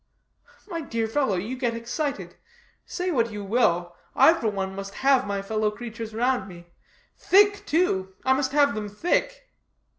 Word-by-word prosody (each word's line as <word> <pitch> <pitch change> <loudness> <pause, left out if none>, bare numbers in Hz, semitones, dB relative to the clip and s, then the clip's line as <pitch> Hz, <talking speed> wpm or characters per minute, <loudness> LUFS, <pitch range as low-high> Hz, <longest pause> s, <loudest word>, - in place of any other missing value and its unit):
"My 335 -4 -4
dear 230 -6 -2
fellow, 225 -3 0
you 210 +8 -3
get 245 -3 -1
excited. 245 +6 -4 0.5
Say 365 0 -2
what 235 -6 +1
you 205 -1 -6
will, 175 -5 +1 0.2
I 325 - +7
for 235 - -2
one 195 -2 -2
must 195 +1 -7
have 270 -5 +4
my 200 -1 -2
fellow 215 +1 0
creatures 225 0 -7
round 240 -2 0
me. 175 -1 -12 0.5
Thick, 405 +1 +4
too 190 - 0
I 265 - +5
must 265 -1 0
have 285 0 +3
them 210 0 -4
thick." - - -1
230 Hz, 160 wpm, -25 LUFS, 205-285 Hz, 0.5 s, I